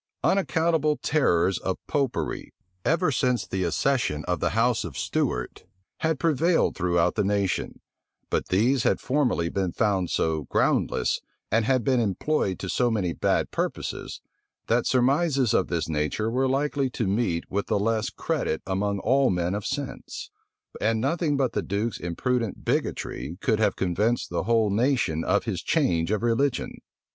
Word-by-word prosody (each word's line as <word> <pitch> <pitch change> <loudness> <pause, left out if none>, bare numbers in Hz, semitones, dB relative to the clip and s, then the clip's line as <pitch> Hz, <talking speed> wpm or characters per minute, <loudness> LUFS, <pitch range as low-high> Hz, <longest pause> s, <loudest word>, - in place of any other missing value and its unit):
Unaccountable 160 -5 +2
terrors 95 - +2
of 95 - -2
Popery, 140 -4 -2 0.3
ever 165 0 +2
since 125 -2 +1
the 95 0 -2
accession 90 - 0
of 90 0 -1
the - - +1
house 120 0 +2
of - - -7
Stuart, - - -2 0.4
had 160 -2 0
prevailed 165 +2 +2
throughout 90 0 +1
the 105 - 0
nation; 100 -2 -1 0.5
but - - 0
these 120 +8 +2
had - - +2
formerly 130 - +1
been 95 0 -1
found 95 -4 0
so 80 -3 0
groundless, - - +1 0.3
and 110 +1 +2
had 130 -1 +2
been 130 0 +2
employed 105 - 0
to - - -6
so 125 -1 +1
many 95 -7 0
bad - - 0
purposes, - - -4 0.4
that 120 +1 +1
surmises 135 -1 +2
of - - +2
this 85 -3 -1
nature 80 +8 -1
were 130 +2 +1
likely 140 0 0
to 120 -2 -2
meet 95 -4 0
with 100 +1 -1
the - - +1
less 110 +3 0
credit 80 -7 -2
among 100 +2 -1
all 130 +6 +3
men 90 0 0
of 105 0 -3
sense; 135 -1 -5 0.5
and 110 +1 +2
nothing 150 +3 0
but 135 -2 +1
the - - 0
duke's 105 +4 -2
imprudent 115 +6 -2
bigotry 85 +5 -2
could 110 -2 +1
have 105 -2 +2
convinced 105 +6 0
the - - -1
whole 115 -3 +2
nation 105 - +1
of - - +1
his - - -3
change 85 -1 +1
of 105 +1 0
religion. 120 +3 +1
115 Hz, 155 wpm, -26 LUFS, 95-135 Hz, 0.5 s, all